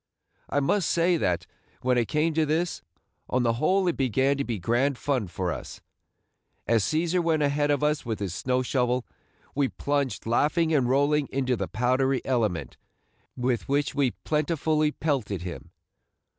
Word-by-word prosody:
I 145 - +1
must 180 +5 +1
say 170 +1 +3
that, 90 - 0 0.4
when 125 0 +2
it 120 -2 +1
came 155 +2 +1
to 160 +1 +2
this, 160 +3 -1 0.5
on 125 0 +1
the 115 -1 +2
whole 185 +4 +3
it 175 - +1
began 135 +2 +2
to 140 - 0
be 120 -5 -3
grand 120 +8 +1
fun 130 -8 -1
for 90 0 -3
us. - - -7 0.9
As 115 -3 +2
Cæsar 170 - +1
went 160 -2 +2
ahead 145 +1 +1
of 145 -1 +1
us 150 0 +1
with 115 -3 -3
his 100 -4 -4
snow 125 +6 0
shovel, 125 -1 0 0.5
we 140 -1 +2
plunged 140 -1 -2
laughing 155 +8 +2
and 130 -5 +2
rolling 145 +2 +2
into 130 -2 0
the - - -3
powdery 130 +2 +1
element, 110 -9 -1 0.6
with 125 -1 -1
which 140 0 +1
we 140 -3 +2
plentifully 155 0 +1
pelted 125 - -2
him. 90 -2 -7
135 Hz, 165 wpm, -26 LUFS, 120-150 Hz, 0.9 s, say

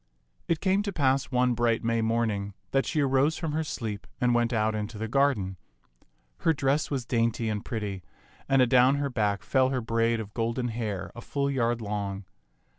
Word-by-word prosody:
It 165 -2 0
came 195 +1 +2
to 205 -1 -3
pass 135 -6 +2
one 125 -1 +2
bright 115 -1 +1
May 115 0 +1
morning 110 -3 -1 0.2
that 135 - +1
she 155 - +1
arose 135 +3 +2
from 160 -3 -3
her 160 +2 0
sleep 110 -8 -5
and 125 -1 +3
went 120 0 +2
out 110 -2 +1
into 105 +1 -4
the 110 +1 -3
garden. 115 -8 +1 0.8
Her 165 - +3
dress 140 +1 0
was 135 -4 -2
dainty 115 -2 0
and 105 -1 -2
pretty, 105 -4 -4 0.5
and 135 -2 +5
adown 125 +2 +5
her 140 -1 -1
back 105 -4 0
fell 130 -1 +2
her 130 -1 0
braid 115 0 +1
of 105 -2 -7
golden 115 +2 -1
hair 105 -5 -4
a 120 - -9
full 140 +2 -1
yard 120 -3 0
long. 100 -2 -3
120 Hz, 190 wpm, -27 LUFS, 110-135 Hz, 0.8 s, and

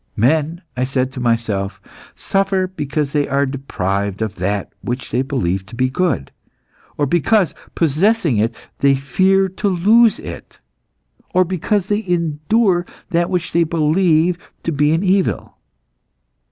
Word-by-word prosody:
'Men,' 155 - +1
I 125 - 0
said 130 0 -1
to 130 - -7
myself, 115 -5 -1 0.4
'suffer 195 -1 0
because 150 -5 -3
they 145 -1 +1
are 140 +1 +1
deprived 100 -7 -2
of 110 -3 -5
that 100 +3 -2
which 125 +1 -4
they 125 - +1
believe 110 -10 -1
to 115 - -11
be 130 +1 0
good; 140 - -1 0.7
or 145 - +2
because, 175 +6 +2 0.2
possessing 165 - +2
it 115 +2 0 0.2
they 140 -1 +4
fear 190 +9 +2
to 190 +3 -3
lose 215 +5 +4
it; - - -9 0.8
or 185 - +6
because 185 +2 -1
they 210 +1 -1
endure 175 +3 +1 0.3
that 170 0 +1
which 175 -2 -2
they 170 - +3
believe 165 +1 +2 0.2
to 165 - -1
be 150 0 +2
an 165 +4 +1
evil. 190 0 0
155 Hz, 140 wpm, -18 LUFS, 130-185 Hz, 0.8 s, or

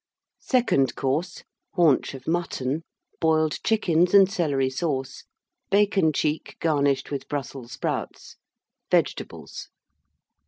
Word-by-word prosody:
SECOND 215 - +1
COURSE. 145 +7 -2 0.3
Haunch 160 -6 +3
of 130 -1 -11
Mutton. 160 -4 -1 0.4
Boiled 155 -1 +1
Chickens 180 -4 +2
and 195 -1 +7
Celery 140 -7 0
Sauce. 135 -3 -3 0.4
Bacon 195 -4 +3
cheek, 150 +1 -2
garnished 140 -4 +1
with 140 - -4
Brussels 135 -3 -5
Sprouts. 135 - -4 0.5
Vegetables. - - -2
155 Hz, 95 wpm, -25 LUFS, 135-175 Hz, 0.5 s, and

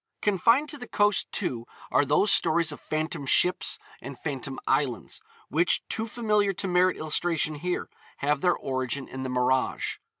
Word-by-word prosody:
Confined 230 - +3
to 295 -1 -7
the 245 - -8
coast, 205 -1 +1
too, 125 - -3 0.2
are 145 - +3
those 150 +9 +3
stories 170 -2 +3
of 150 - -9
phantom 155 0 -3
ships 180 +6 +3 0.2
and 135 +1 -8
phantom 135 -2 -4
islands 130 -6 -1 0.3
which, 165 +5 +2
too 225 +1 -1
familiar 210 -3 +1
to 190 - -4
merit 180 0 +3
illustration 155 0 0
here, 175 +4 -3 0.3
have 145 0 0
their 180 -1 +3
origin 130 0 -3
in 130 - -7
the 130 - -3
mirage. 125 +1 0
160 Hz, 160 wpm, -27 LUFS, 135-195 Hz, 0.3 s, Confined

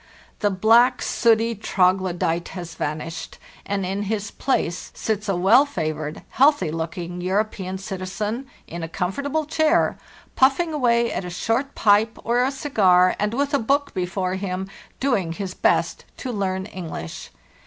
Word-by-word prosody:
The 205 - +2
black, 225 +6 +4
sooty 230 0 +2
troglodyte 180 -4 +1
has 175 -2 -6
vanished, 160 +2 -5 0.3
and 200 -1 -1
in 195 +2 -2
his 210 -2 -2
place 180 -10 -1
sits 210 -1 -2
a 195 - +2
well 195 +10 +6
favored, 155 - -4
healthy 285 - +3
looking 170 +2 -4
European 190 0 -1
citi 190 -1 -6
zen 215 +7 -3 0.2
in 170 +1 -7
a 165 - -5
comfortable 280 - -2
chair, 315 +2 +2 0.4
puffing 285 +5 +3
away 235 -4 +2
at - - -3
a 180 - -5
short 225 +10 -1
pipe 215 +1 +3
or 240 +2 +2
a 260 - +2
cigar, 190 -10 +3
and 210 +2 0
with 285 +2 0
a 280 - +3
book 280 +5 0
before 185 0 -2
him, 190 0 -3 0.3
doing 205 -11 0
his 190 +1 -5
best - - +1
to 255 - -4
learn 190 -3 -2
English. 170 - -7
200 Hz, 150 wpm, -23 LUFS, 180-240 Hz, 0.4 s, well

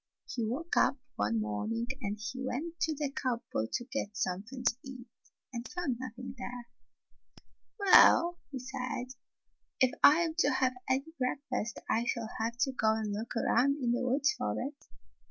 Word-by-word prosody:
He 240 -2 -3
woke 315 +9 -2
up - - +4 0.2
one 105 +2 +1
morning 110 - -2 0.2
and 205 -2 -2 0.2
went 290 +6 -3
to 320 -1 +1
the 290 -1 -2
cup 250 -4 -2
board 110 - -1
to 240 - -1
get 225 -6 -4
something 210 +8 -3
to 245 - +3
eat, 255 -2 -9 0.5
and 235 0 -4
found 330 -9 -2
nothing 255 0 -6
there. 245 -1 -6 1.1
"Well," 350 -3 +7
he 275 - -5
said, 255 -1 -4 0.7
"if 260 -1 +5
I 305 +4 +8
am 330 -2 0
to - - +4
have 260 -1 +2 0.2
any 275 +5 0
breakfast 250 -3 -2
I 230 +1 +1
shall 230 -2 -2
have 230 +2 -1
to 270 - +3
go 220 -4 +2
and 215 -2 -2
look 220 +3 -4
aroimd 255 +4 +3
in 245 -3 +1
the 245 +2 +1
woods 265 +2 +3
for 105 0 -2
it." 280 +2 -6
250 Hz, 170 wpm, -32 LUFS, 230-275 Hz, 1.1 s, I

